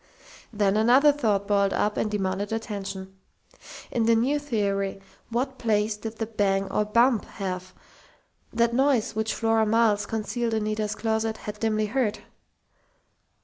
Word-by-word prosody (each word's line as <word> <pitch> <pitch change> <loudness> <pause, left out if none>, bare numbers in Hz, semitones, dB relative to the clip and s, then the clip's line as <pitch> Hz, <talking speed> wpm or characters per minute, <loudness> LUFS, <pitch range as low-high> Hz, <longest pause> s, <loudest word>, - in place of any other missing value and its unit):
Then 205 -2 +1
another 255 +7 +6
thought 210 -8 0
boiled 200 -1 +2
up 210 0 0
and 215 - 0
demanded 200 0 -2
attention. 195 -3 -5 0.7
In 230 -2 +1
the 230 - +5
new 265 +6 +1
theory, 200 -8 -1 0.3
what 260 +3 -2
place 215 -1 +1
did 220 +1 -7
the 225 - -2
"bang 200 -3 0
or 210 - +1
bump" 235 +2 +3
have 185 -2 -5 0.8
that 235 0 +1
noise 265 -3 +2
which 220 0 -1
Flora 225 -1 +2
Miles, 220 -2 +2
concealed 225 +1 -2
in 220 - 0
Nita's 215 0 -2
closet, 220 0 -1
had 210 0 -7
dimly 215 -1 +1
heard? 220 -1 0
220 Hz, 145 wpm, -26 LUFS, 205-230 Hz, 0.8 s, another